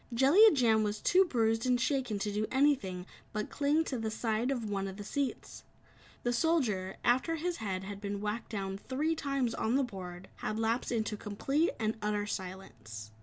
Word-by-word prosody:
Jellia 280 - +7
Jam 230 -7 +3
was 210 0 -1
too 375 +2 +4
bruised 225 -5 +1
and 250 -1 +3
shaken 255 -4 0
to 205 +1 -2
do 215 +1 0
anything 255 -10 +2 0.3
but 215 0 -3
cling 295 +3 +2
to 260 -6 -3
the 220 -1 -2
side 220 +2 -1
of 245 -5 -1
one 195 -1 -2
of 190 0 -7
the 205 - -6
seats. 275 +5 -3 0.6
The 245 - +1
Soldier, 235 - +1
after 255 +7 +2
his 345 +2 -2
head 190 -4 -3
had 200 +1 -7
been 200 -1 -3
whacked 210 +3 -3
down 195 -2 -4
three 300 +8 -1
times 275 -6 -1
on 225 +2 0
the 275 - +3
board 185 -6 -7
had 215 0 -3
lapsed 225 +3 0
into 220 -2 -1
complete 270 +11 0
and 220 0 0
utter 210 0 0
silence. 115 - -7
225 Hz, 185 wpm, -32 LUFS, 205-265 Hz, 0.6 s, Jellia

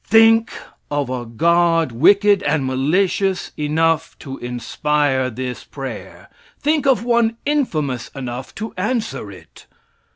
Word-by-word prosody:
Think 225 +1 +5 0.4
of 145 -3 -2
a 125 -2 -4
God 165 +4 +2
wicked 200 - +4
and 150 -2 0
malicious 180 +8 0
enough 160 +2 0
to 135 -2 -8
inspire 130 +2 -1
this 125 +1 -5
prayer. - - -8 0.3
Think 300 -1 +1
of 255 -6 +3
one 235 -1 +2
infamous 155 - -1
enough 125 -1 -6
to 220 +1 -6
answer 220 +4 -2
it. - - -15
160 Hz, 120 wpm, -20 LUFS, 130-210 Hz, 0.4 s, Think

